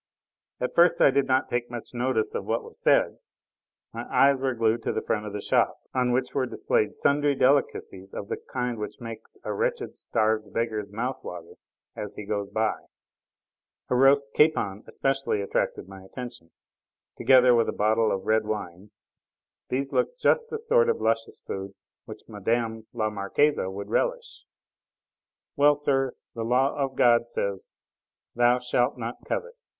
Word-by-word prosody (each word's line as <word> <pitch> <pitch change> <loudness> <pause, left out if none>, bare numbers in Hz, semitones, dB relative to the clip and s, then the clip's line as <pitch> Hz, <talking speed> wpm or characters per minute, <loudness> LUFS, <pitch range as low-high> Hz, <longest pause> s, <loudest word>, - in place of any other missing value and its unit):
At 125 - -2
first 175 +1 +5
I - - +6
did 140 0 +1
not 130 0 +2
take 120 0 -2
much 120 0 -8
notice 130 - 0
of 470 - -3
what - - 0
was 460 +1 -11
said: - - +3 0.7
my - - -5
eyes 140 0 +5
were 130 -1 -1
glued 115 0 +1
to - - -1
the - - -3
front 105 -1 -1
of 100 - -7
the 105 - -4
shop, - - +2 0.2
on 125 -1 +1
which 130 +1 0
were 130 -2 0
displayed 105 - 0
sundry 145 0 +2
delicacies 125 -8 +1
of 100 - -6
the - - -3
kind 125 -3 -2
which 105 - -6
makes 115 -2 -8
a - - -3
wretched, - - -2
starved 110 -1 0
beggar's 110 -3 -2
mouth 125 +5 -3
water 85 -1 -8 0.4
as 105 -1 -6
he 105 - -7
goes 100 -1 -2
by; 110 +1 -1 1.1
a - - +3
roast 140 +2 +4
capon 110 -10 +2
especially 135 -5 -1
attracted 100 -2 -2
my 95 0 -11
attention, 120 -3 -9 0.7
together 130 -2 +6
with 115 -1 +3
a - - +1
bottle 110 +1 +2
of 95 -1 -2
red 110 -1 +2
wine; 100 -2 -5 0.8
these 135 +2 -2
looked - - 0
just 470 -1 +2
the - - -3
sort 470 +1 +3
of 465 - +1
luscious 115 0 -1
food 95 0 -6 0.3
which - - -10
Mme. 110 +1 -2
la 110 -3 -1
Marquise 105 +9 +1
would 100 +2 -6
relish. - - -2 1.1
Well, 145 0 +5
sir, 135 -3 0 0.2
the 115 - -5
law 125 +4 +2
of 135 -2 -2
God 120 -1 +4
says: 100 -4 -4 0.6
"Thou 120 +1 +4
shalt 125 +1 0
not 115 0 -6
covet!" 480 0 -3
120 Hz, 165 wpm, -26 LUFS, 105-135 Hz, 1.1 s, I